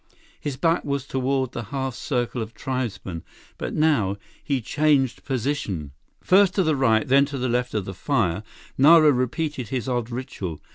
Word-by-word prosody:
His 140 -3 -4
back 165 +3 +2
was 140 -2 -2
toward 130 -1 -1
the 120 - -5
half 135 +2 -3
circle 120 -1 -2
of 110 +1 -7
tribesmen, 110 - -4 0.4
but - - -4
now, 125 -11 +2 0.3
he 140 -2 0
changed 140 +1 +1
position. 120 - -2 0.3
First 190 0 +4
to 190 - +3
the 155 -2 +2
right, 115 -5 +2
then 140 +2 +5
to 140 0 -5
the 130 0 -1
left 125 -1 -1
of 105 -3 -1
the 95 - -6
fire, 95 - 0 0.4
Nara 155 +2 +7
repeated 130 +1 -1
his 125 +1 -3
odd 120 -2 -1
ritual. 120 - -5
130 Hz, 170 wpm, -24 LUFS, 115-145 Hz, 0.4 s, Nara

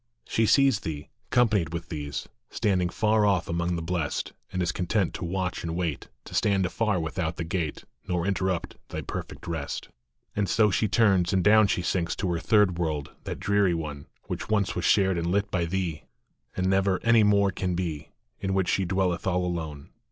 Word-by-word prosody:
She 110 -1 +2
sees 135 -1 +5
thee, 75 -2 -6 0.2
companied 105 -9 +2
with 85 - -5
these, 75 -4 -4 0.2
Standing 95 -5 +1
far 110 +3 +2
off 95 -5 +2
among 85 +1 -1
the 85 - -3
Blest, 85 -3 -2 0.2
And 90 - -3
is 85 - +1
content 90 +2 0
to - - -5
watch 90 +1 -2
and 85 0 -3
wait, 85 -5 -2 0.2
To - - -11
stand 100 -2 +2
afar 105 0 0
without 80 +1 -2
the 85 - -3
gate, 80 -3 -3 0.2
Nor 90 -2 0
interrupt 95 -3 -1
thy - - -4
perfect - - -7
rest. 80 -4 -4 0.5
And 100 -2 0
so 105 -2 +4
she 105 +3 +2
turns, 100 -4 +3
and 95 -2 +2
down 110 +1 +6
she 90 -3 0
sinks 85 -2 0
To 95 -3 -1
her 85 - -1
third 100 -3 +3
world, 75 -4 -2
that - - -4
dreary 100 -3 +2
one, 75 -3 -5 0.2
Which - - -5
once 105 -3 +1
was 90 - -1
shared 95 -3 +3
and 85 - -2
lit 100 +1 0
by 85 -2 +1
thee, 85 -3 -3 0.5
And 95 0 +1
never 95 0 +2
any 115 -1 +5
more 100 -1 +4
can 90 -1 -2
be, 85 -5 -3 0.3
In 95 0 -1
which 95 -2 +1
she 95 - +1
dwelleth 90 -1 0
all 90 -1 +1
alone. 80 -5 -4
90 Hz, 195 wpm, -27 LUFS, 85-100 Hz, 0.5 s, down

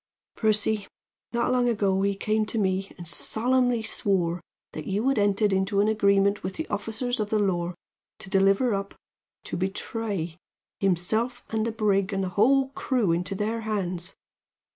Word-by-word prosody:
"Percy, 215 -1 +1 0.4
not 235 +1 +1
long 250 -1 +3
ago 200 -4 +1
he 200 0 +1
came 215 +2 +1
to 225 - -3
me 190 -1 0
and 175 -1 -9
solemnly 245 +5 +1
swore 180 -5 0 0.3
that 155 - -7
you 205 +6 0
had 275 - +2
entered 205 0 +2
into 190 +1 +1
an 205 - +4
agreement 200 -1 +3
with 185 +1 -4
the 320 - -3
officers 225 +4 -2
of 210 -1 -1
the 215 - +2
law 180 -4 0 0.4
to - - -10
deliver 195 +5 +3
up 200 0 -3 0.5
to - - -5
betray 190 -2 -3 0.4
himself 215 +7 0
and 220 0 0
the - - -1
brig 205 -3 +1
and 195 -1 -1
the 185 - -2
whole 265 +8 +3
crew 250 -8 0
into 180 +3 -1
their 220 +3 -1
hands. 190 -4 -3
205 Hz, 165 wpm, -26 LUFS, 190-225 Hz, 0.5 s, an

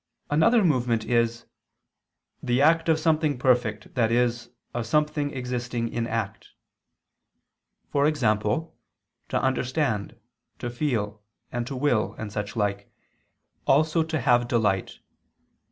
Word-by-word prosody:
Another 210 +10 +4
movement 125 -8 +1
is 115 -1 +1 1.0
"the 120 +1 +1
act 165 +3 +4
of 160 -1 +3
something 155 -3 +1
perfect, 120 -5 +1
i.e. 120 0 +3 0.4
of 120 -2 -3
something 150 +2 +1
existing 125 -3 -3
in 115 0 -2
act," 110 -4 -3 1.5
e.g. 145 +1 +2
to 110 +7 +1 0.7
understand, 130 -4 0 0.4
to 120 - -4
feel, 115 -6 -2 0.3
and 120 0 -3
to 135 - -5
will 125 -5 +1
and 110 -2 -6
such 105 +1 -4
like, 100 -2 -2 0.8
also 155 +3 +3
to 160 -1 -1
have 120 -1 +3
delight. 105 -6 0
125 Hz, 110 wpm, -26 LUFS, 115-150 Hz, 1.5 s, Another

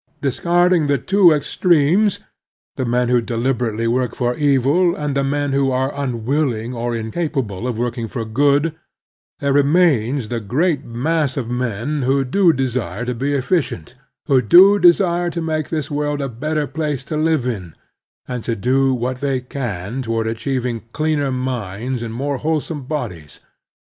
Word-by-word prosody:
Discarding 175 +4 +2
the 140 -1 +2
two 190 0 +4
extremes, 170 +5 +2 0.6
the 130 - -2
men 125 +1 +1
who 125 -1 +3
deliberately 115 -1 -1
work 120 +1 0
for 120 -1 0
evil, 145 +5 +2
and 150 -1 -3
the 140 - +1
men 145 0 -1
who 135 -1 +2
are 130 +2 0
unwilling 125 -2 -1
or 120 0 -2
incapable 115 - -3
of 120 -3 -3
working 120 -1 -2
for 115 0 -4
good, 145 +7 +2 0.7
there 140 -1 +1
remains 140 -5 +2
the 120 - -2
great 140 - 0
mass 145 +4 -1
of 120 -3 -3
men 125 +4 -2
who 135 +1 +1
do 175 +6 +4
desire 125 - -2
to 125 - -2
be 140 +4 -1
efficient, 135 - -1 0.3
who 135 -2 +3
do 190 - +7
desire 175 -1 +4
to 170 - -4
make 155 -2 -2
this 155 -3 -3
world 145 0 -1
a 140 - -2
better 150 +5 -2
place 145 -1 -3
to 155 - -4
live 155 -3 +1
in, 95 -10 -4 0.5
and 125 -3 -4
to 115 - -1
do 130 +5 +2
what 125 +1 -2
they 135 -2 0
can 125 -3 -5
toward 115 -2 -2
achieving 120 +1 -2
cleaner 150 -3 0
minds 125 -1 -3
and 115 -1 -5
more 140 +2 -2
whole 155 +3 0
some 150 -2 -7
bodies. 105 - -5
135 Hz, 160 wpm, -19 LUFS, 120-150 Hz, 0.7 s, do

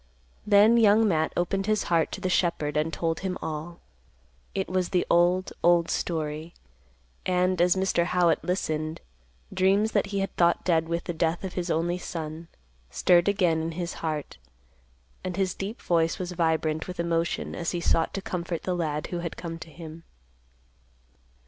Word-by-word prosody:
Then 210 +3 +6
Young 220 0 +5
Matt 160 -4 +1
opened 195 +3 0
his 215 -1 +2
heart 165 -2 +1
to - - -5
the 185 - -1
shepherd 170 -5 0
and 155 +2 +1
told 165 0 -1
him 185 -1 -3
all. 160 +2 -6 0.7
It 190 - -1
was 185 -1 -1
the 180 - +1
old, 175 +2 +3
old 170 -1 +4
story; 155 0 -3 0.7
and, 180 -1 +1
as 180 +1 +4
Mr. 190 -2 +1
Howitt 175 -1 +2
listened, 155 -3 -2 0.5
dreams 200 +4 +3
that - - +1
he 200 0 -3
had 195 - -3
thought 170 -1 +2
dead 165 -2 +2
with 170 0 -1
the 175 - -4
death 165 +2 0
of 190 - -4
his 180 -1 -3
only 175 +2 0
son, 160 -1 -6 0.4
stirred 175 - +3
again 180 -6 +2
in 165 +1 -3
his 175 +1 -4
heart, 155 - -3 0.9
and 185 -1 -4
his 190 -2 +1
deep 200 +4 -5
voice 165 -1 +1
was 180 -1 -4
vibrant 160 -2 0
with 180 -1 -7
emotion 170 -1 -1
as 170 -1 -2
he 175 - -2
sought 165 -1 +1
to 195 - -4
comfort 170 -2 -4
the 185 - -1
lad 150 -3 -2
who 175 - -1
had 170 -1 -5
come 165 -1 -6
to 165 - -10
him. 160 0 -10
175 Hz, 175 wpm, -27 LUFS, 165-185 Hz, 0.9 s, Then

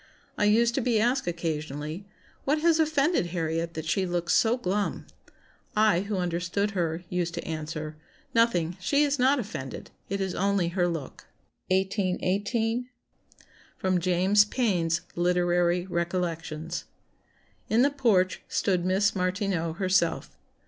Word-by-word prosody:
I 205 - +1
used 230 +3 +4
to 270 - 0
be 230 -2 +2
asked 245 +1 +1
occasionally, 155 0 -3 0.4
'What 295 +3 +1
has 330 -1 +4
offended 310 - +2
Harriet 165 -1 -2
that 160 0 -4
she 190 +5 +1
looks 175 0 0
so 230 +2 +3
glum?' 205 -2 -2 0.7
I, 215 -5 +4
who 200 +1 -3
understood 180 +3 -1
her, 170 -3 -2
used 175 -1 -2
to 170 - -4
answer, 155 -1 -5 0.4
'Nothing; 180 -7 +2
she 280 +10 +2
is 285 -1 0
not 265 +3 +4
offended, 165 - -6 0.2
it 200 +1 -2
is 190 -2 -2
only 195 -3 +1
her 175 0 +1
look,'" 165 -6 -6 0.4
1818. 200 +5 0 0.9
[Sidenote: 185 -1 +1
James 185 +3 +4
Payn's 180 -8 0
Literary 175 0 +2
Recollections.] 170 -3 -3 0.8
"In 230 +3 +4
the 285 - +3
porch 215 -10 +2
stood 180 -3 0
Miss 190 +3 +2
Martineau 185 -3 -1
herself. 185 -1 0
185 Hz, 130 wpm, -27 LUFS, 170-215 Hz, 0.9 s, used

